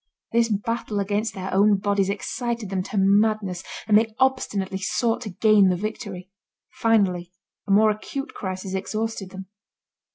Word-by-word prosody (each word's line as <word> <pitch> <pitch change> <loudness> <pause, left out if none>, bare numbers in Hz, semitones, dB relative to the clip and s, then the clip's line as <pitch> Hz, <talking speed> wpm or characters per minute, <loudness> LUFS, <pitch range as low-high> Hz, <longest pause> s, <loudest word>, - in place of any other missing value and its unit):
This 230 0 +3
battle 215 0 -2
against 205 +3 -1
their 190 -1 -5
own 200 +1 +4
bodies 200 -1 +1
excited 230 +1 -3
them 190 -1 0
to 210 - -5
madness, 200 -1 +2 0.2
and 210 - +4
they 220 0 +3
obstinately 205 -8 0
sought 225 +5 0
to 225 - -5
gain 205 0 +4
the 180 - +2
victory. 195 -2 -6 0.4
Finally, 190 -6 +1 0.4
a - - -1
more 215 +2 +5
acute 270 +6 -5
crisis 190 0 -5
exhausted 215 +1 -3
them. 190 0 -8
205 Hz, 150 wpm, -24 LUFS, 190-220 Hz, 0.4 s, more